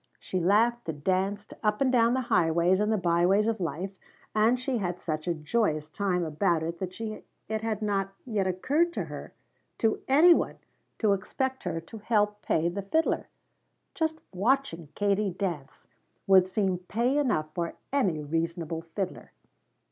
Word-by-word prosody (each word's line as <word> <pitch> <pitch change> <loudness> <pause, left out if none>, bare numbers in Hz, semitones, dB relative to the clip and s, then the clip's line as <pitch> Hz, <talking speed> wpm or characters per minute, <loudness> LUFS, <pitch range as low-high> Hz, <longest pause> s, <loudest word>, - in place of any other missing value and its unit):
She 185 - -3
laughed 215 +4 +2
and 145 -2 -5
danced 195 +3 0
up 210 -1 +1
and 265 -2 +3
down 235 -1 +4
the 260 - +1
highways 175 -4 +3
and 210 +1 +1
the 220 - +2
byways 180 +3 +3
of 225 -1 0
life 185 +3 -4 0.3
and 225 +4 +3
she 255 -1 -1
had 180 -2 -2
such 155 0 -4
a 170 - +1
joyous 155 -2 0
time 185 -2 0
about 165 +1 +1
it 170 +1 -4
that 185 +1 -5 0.5
it 220 0 -2
had 220 -1 -2
not 195 -2 0
yet 210 -6 0
occurred 290 - +1 0.8
to 225 -1 +1
any 315 +6 +7
one - - -1 0.4
to 215 -3 +3
expect 260 +7 -3
her 170 -2 -1
to 165 +7 -11
help 210 -1 +1
pay 160 +1 +1
the 180 +4 -2
fiddler. 315 +12 0 0.7
Just 320 -4 -1 0.2
watching 195 - 0
Katie 205 0 +1
dance 170 -7 -5 0.4
would 190 -1 +6
seem 190 -2 0
pay 235 +10 0
enough 155 - 0
for 170 -2 -3 0.2
any 185 - +1
reasonable 165 +1 -2
fiddler. 180 +3 -5
195 Hz, 155 wpm, -28 LUFS, 170-225 Hz, 0.8 s, any